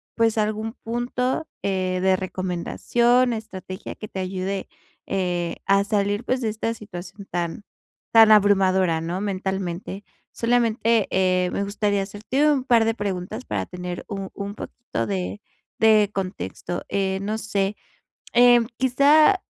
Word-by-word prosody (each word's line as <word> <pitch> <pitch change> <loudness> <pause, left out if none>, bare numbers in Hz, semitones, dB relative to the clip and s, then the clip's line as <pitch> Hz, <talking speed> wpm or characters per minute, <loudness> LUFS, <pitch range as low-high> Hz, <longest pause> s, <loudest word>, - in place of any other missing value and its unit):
pues, 225 -1 +2
algún 215 +1 -1
punto, 250 +5 -2
eh, 185 -2 -1
de 190 0 +4
recomendación, 200 +7 +1
estrategia 190 -4 -7
que 215 - -9
te 190 - -6
ayude, 190 +1 -3 0.4
eh, 175 -3 -1
a 195 0 +4
salir, 205 +1 0
pues, 255 0 -1
de 225 - 0
esta 220 +1 -2
situación 195 -1 -10
tan 175 +2 -3 0.5
tan 225 -1 +8
abrumadora, 190 -5 +4
¿no?, 170 +3 -3
mentalmente. 190 0 -3 0.3
Solamente, 230 -2 +2
eh, 185 -1 +2
me 200 - -1
gustaría 205 -1 0
hacerte 220 +9 0
un 280 -4 +2
par 235 -4 +4
de 225 - +2
preguntas, 205 +3 -4
para - - -2
tener 180 -1 -6
u 195 -2 -5
un 200 0 -6
poquito 220 - -5
de 95 -1 -3 0.4
de 215 -2 +5
contexto. 180 - -4
Eh, 190 -1 -1
no 215 +2 -2
sé, 200 -2 -1 0.6
em, 240 -1 +6
quizá 290 +8 +5
200 Hz, 135 wpm, -23 LUFS, 185-225 Hz, 0.6 s, tan